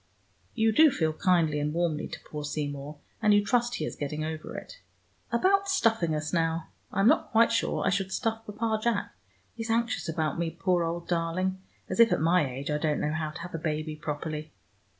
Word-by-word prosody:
You 220 Hz, 0 st, +3 dB
do 310 Hz, +8 st, +7 dB
feel 160 Hz, -, 0 dB
kindly 165 Hz, -4 st, +2 dB
and 150 Hz, +2 st, -1 dB
warmly 170 Hz, -3 st, 0 dB
to -, -, -8 dB
poor 150 Hz, -1 st, -7 dB
Seymour, 145 Hz, 0 st, -4 dB, 0.2 s
and 210 Hz, -2 st, +5 dB
you 205 Hz, 0 st, +3 dB
trust 240 Hz, +1 st, +1 dB
he -, -, -2 dB
is -, -, -5 dB
getting 150 Hz, +2 st, -3 dB
over 155 Hz, -1 st, -5 dB
it. -, -, -10 dB, 0.5 s
About 390 Hz, +10 st, +3 dB
stuffing 225 Hz, -, +2 dB
us, 150 Hz, 0 st, -3 dB
now. 165 Hz, -1 st, 0 dB, 0.2 s
I'm 195 Hz, +2 st, +3 dB
not -, -, +4 dB
quite 230 Hz, 0 st, +5 dB
sure 230 Hz, -, 0 dB
I 195 Hz, -, +3 dB
should 195 Hz, -1 st, -1 dB
stuff 225 Hz, +1 st, -1 dB
Papa 220 Hz, +1 st, -1 dB
Jack. 230 Hz, -2 st, 0 dB, 0.4 s
He's 225 Hz, 0 st, -6 dB
anxious 230 Hz, -5 st, 0 dB
about 160 Hz, 0 st, -1 dB
me, 170 Hz, -1 st, 0 dB
poor 175 Hz, +1 st, +1 dB
old 170 Hz, +1 st, -3 dB
darling, 180 Hz, +2 st, -1 dB, 0.3 s
as -, -, -4 dB
if 230 Hz, -1 st, +7 dB
at -, -, +2 dB
my 165 Hz, -2 st, +3 dB
age 135 Hz, +4 st, -4 dB
I 150 Hz, -, 0 dB
didn't 150 Hz, -1 st, 0 dB
know 150 Hz, -, 0 dB
how 155 Hz, -1 st, -2 dB
to 155 Hz, -, -8 dB
have 180 Hz, +1 st, -8 dB
a 165 Hz, -, -3 dB
baby 155 Hz, -1 st, -2 dB
properly. 150 Hz, +1 st, -5 dB
170 Hz, 205 wpm, -28 LUFS, 155-220 Hz, 0.5 s, do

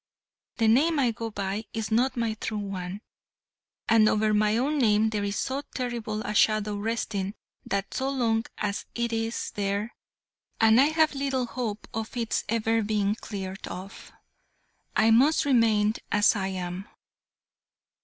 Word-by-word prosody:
The 225 Hz, -, +2 dB
name 295 Hz, +9 st, +4 dB
I 255 Hz, -4 st, +3 dB
go 230 Hz, 0 st, -5 dB
by 200 Hz, +1 st, -3 dB
is 220 Hz, -2 st, -3 dB
not 245 Hz, +4 st, +2 dB
my 230 Hz, -2 st, 0 dB
true 215 Hz, 0 st, -4 dB
one, 195 Hz, -1 st, -5 dB, 0.9 s
and 220 Hz, -1 st, +5 dB
over 215 Hz, 0 st, +2 dB
my 210 Hz, +1 st, +3 dB
own 290 Hz, +5 st, 0 dB
name 220 Hz, -2 st, +3 dB
there 210 Hz, -2 st, -1 dB
is 200 Hz, 0 st, -2 dB
so 270 Hz, +2 st, -2 dB
terrible 235 Hz, -4 st, -3 dB
a 210 Hz, -, -3 dB
shadow 215 Hz, -1 st, +2 dB
resting 205 Hz, -2 st, -2 dB, 0.3 s
that 195 Hz, 0 st, -2 dB
so 265 Hz, 0 st, -1 dB
long 230 Hz, -4 st, +1 dB
as 205 Hz, -1 st, -3 dB
it 235 Hz, -1 st, -1 dB
is 225 Hz, +1 st, -2 dB
there 205 Hz, +2 st, -2 dB, 0.7 s
and 225 Hz, +2 st, +6 dB
I -, -, +6 dB
have 315 Hz, 0 st, +2 dB
little 270 Hz, -2 st, -1 dB
hope 230 Hz, -4 st, -4 dB
of 225 Hz, +3 st, -4 dB
its 230 Hz, -2 st, -1 dB
ever 225 Hz, 0 st, +1 dB
being 205 Hz, -1 st, +1 dB
cleared 195 Hz, -3 st, -6 dB
off 190 Hz, +2 st, -9 dB, 0.8 s
I 220 Hz, +1 st, +4 dB
must 275 Hz, +8 st, +4 dB
remain 220 Hz, -5 st, +3 dB, 0.2 s
as 210 Hz, +1 st, +4 dB
I 190 Hz, -2 st, -1 dB
am." 185 Hz, 0 st, -5 dB
220 Hz, 155 wpm, -27 LUFS, 205-235 Hz, 0.9 s, and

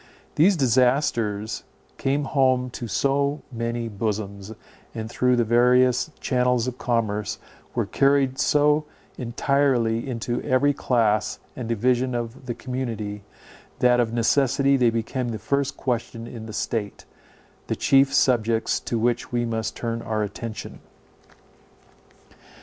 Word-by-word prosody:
These 180 Hz, +5 st, +4 dB
disasters 120 Hz, -5 st, +1 dB, 0.4 s
came 140 Hz, +2 st, 0 dB
home 130 Hz, -2 st, +1 dB
to 120 Hz, -, -6 dB
so 140 Hz, +6 st, 0 dB
many 115 Hz, 0 st, -3 dB
bosoms, 100 Hz, -1 st, -4 dB, 0.4 s
and, 110 Hz, -1 st, -4 dB
through 125 Hz, +2 st, +2 dB
the 120 Hz, -, +2 dB
various 125 Hz, +3 st, +3 dB
channels 125 Hz, -2 st, +1 dB
of 125 Hz, 0 st, -5 dB
commerce, 105 Hz, -4 st, -1 dB, 0.4 s
were -, -, +1 dB
carried 135 Hz, -1 st, +2 dB
so 150 Hz, +1 st, +3 dB, 0.3 s
entirely 125 Hz, -1 st, +1 dB
into 120 Hz, 0 st, -2 dB
every 145 Hz, +1 st, +2 dB
class 110 Hz, -6 st, +1 dB, 0.2 s
and 120 Hz, -3 st, -5 dB
division 125 Hz, +2 st, +1 dB
of 120 Hz, +2 st, -5 dB
the 120 Hz, -, -3 dB
community, 115 Hz, -5 st, -4 dB, 0.6 s
that 125 Hz, 0 st, +4 dB
of 115 Hz, -2 st, +1 dB
necessity 135 Hz, +3 st, +2 dB
they 125 Hz, -3 st, +4 dB
became 115 Hz, +2 st, -2 dB
the 110 Hz, -, -3 dB
first 140 Hz, +5 st, -1 dB
question 120 Hz, -2 st, -3 dB
in 115 Hz, -2 st, -8 dB
the -, -, -7 dB
state, 105 Hz, -1 st, -3 dB, 0.6 s
the -, -, -1 dB
chief 135 Hz, 0 st, +4 dB
subjects 115 Hz, -3 st, +2 dB
to 120 Hz, -, -3 dB
which 120 Hz, +1 st, 0 dB
we 120 Hz, -1 st, 0 dB
must 110 Hz, -1 st, -3 dB
turn 115 Hz, -1 st, -3 dB
our 110 Hz, -1 st, -1 dB
attention. 110 Hz, +1 st, -6 dB
120 Hz, 125 wpm, -24 LUFS, 115-130 Hz, 0.6 s, These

